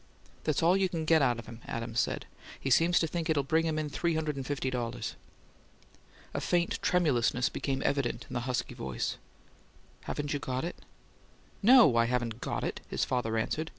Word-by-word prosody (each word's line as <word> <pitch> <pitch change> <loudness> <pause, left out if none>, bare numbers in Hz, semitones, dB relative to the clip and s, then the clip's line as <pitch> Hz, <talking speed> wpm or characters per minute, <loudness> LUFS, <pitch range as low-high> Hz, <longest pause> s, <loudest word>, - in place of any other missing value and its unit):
"That's 155 0 +1
all 175 +3 +5
you 195 -1 +2
can 165 -2 -3
get 160 0 +5
out 125 -3 +3
of 120 - -8
him," 115 -1 -10
Adams 115 0 -3
said. - - -1 0.3
"He 135 - -2
seems 170 +7 +5
to - - +3
think 165 +1 -3
it'll 150 -3 +2
bring 160 +4 +2
him 155 -1 -1
in 155 -1 -1
three 165 +4 -1
hundred 155 -2 -1
and 135 - -4
fifty 135 -2 -1
dollars!" 120 -2 -3 1.2
A - - -2
faint 175 -1 0
tremulousness 140 - +2
became 135 -1 -2
evident 130 -4 0
in - - -9
the 120 - 0
husky 125 - -1
voice. 65 -1 -3 0.9
"Haven't 145 0 -3
you 145 - -1
got 130 0 -3
it?" 175 - -5 0.8
"NO, 230 - +7
I 115 - +5
haven't 120 -1 -2
got - - -2
it!" - - -3
his - - 0
father 115 -3 -1
answered. 155 +8 -1
140 Hz, 190 wpm, -30 LUFS, 120-165 Hz, 1.2 s, NO